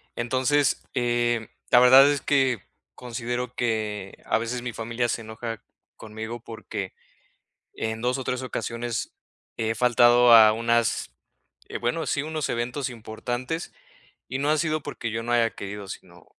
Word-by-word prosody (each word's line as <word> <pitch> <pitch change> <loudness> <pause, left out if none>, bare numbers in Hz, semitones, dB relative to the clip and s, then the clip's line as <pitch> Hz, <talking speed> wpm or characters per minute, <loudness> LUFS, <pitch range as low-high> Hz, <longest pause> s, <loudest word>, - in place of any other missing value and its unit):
Entonces, 130 +4 +1
eh, 120 -2 0 0.2
la 120 - +8
verdad 130 +3 +8
es 145 - -1
que 130 -6 +1 0.3
considero 120 0 -4
que, 105 -4 -2
a - - +2
veces, 120 +2 -3
mi 125 - -4
familia 115 +2 -2
se 115 - -2
enoja 115 0 -6 0.4
conmigo, 110 +2 -7
porque 110 -4 -6 0.8
en 110 0 -3
2 125 +1 +1
o 130 - -5
3 125 0 -2
ocasiones 120 -1 -4 0.4
he 110 0 0
faltado 120 0 +6
a 110 -1 +9
unas, 115 0 +1 0.6
eh, - - -5
bueno, 125 +7 -1
sí, 140 - 0
unos 155 -1 -3
eventos 125 +3 -2
importantes 120 +7 -5 0.6
y 130 - -3
no 145 +2 +1
ha 155 - +3
sido 155 -1 0
porque 115 -4 -5
yo 115 +1 -3
no 120 +1 -2
haya 115 -1 +3
querido, 100 0 -7
sino, 90 -2 -11
120 Hz, 150 wpm, -25 LUFS, 115-125 Hz, 0.8 s, a